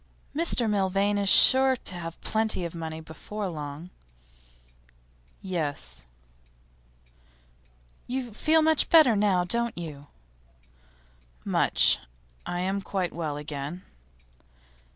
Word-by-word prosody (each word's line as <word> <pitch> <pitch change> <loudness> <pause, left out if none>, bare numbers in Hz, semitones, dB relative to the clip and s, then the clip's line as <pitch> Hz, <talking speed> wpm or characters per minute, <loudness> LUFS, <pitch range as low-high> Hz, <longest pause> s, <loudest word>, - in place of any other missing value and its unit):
'Mr 305 -7 +2
Milvain 200 0 +1
is 200 -1 0
sure 260 +8 +6
to 220 - -7
have 165 -2 -7
plenty 220 -4 -1
of 170 - -6
money 160 -1 -6
before 195 +6 -6
long.' 155 +1 -7 1.5
'Yes.' 145 - -4 2.1
'You 250 -2 -4
feel 315 +7 +2
much 315 -1 +3
better 310 -9 +6
now, 200 -3 +2
don't 235 +4 -1
you?' 150 -4 -8 1.4
'Much. - - +3 0.5
I 175 0 -3
am 195 +2 -1
quite 190 -1 -3
well 155 -4 -4
again. 150 +3 -6
185 Hz, 100 wpm, -26 LUFS, 160-220 Hz, 2.1 s, sure